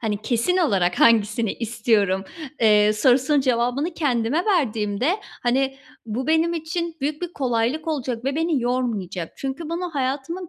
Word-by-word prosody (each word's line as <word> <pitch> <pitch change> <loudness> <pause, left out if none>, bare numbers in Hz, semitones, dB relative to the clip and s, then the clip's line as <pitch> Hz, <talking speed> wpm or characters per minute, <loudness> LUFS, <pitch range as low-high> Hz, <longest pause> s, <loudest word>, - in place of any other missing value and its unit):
hani, 215 -2 -2
kesin 240 +11 +1
olarak 195 - +1
hangisini 225 -1 +3
istiyorum?" 215 -4 0 0.4
eee, 210 -2 +5
sorusunun 260 +6 +3
cevabını 255 +5 0
kendime 275 +1 0
verdiğimde, 260 - 0 0.2
hani, 265 +2 +1 0.3
bu 240 +4 -3
benim 320 +2 +2
için 330 +1 -3
büyük 295 +4 -3
bir 350 -1 -4
kolaylık 255 +4 -1
olacak 255 -6 -3
ve 275 +2 -1
beni 325 -4 +1
yormayacak. 215 -9 -2
Çünkü 275 +4 -5
bunu 350 +1 -3
hayatımın, 280 +7 -3
255 Hz, 135 wpm, -23 LUFS, 225-315 Hz, 0.4 s, eee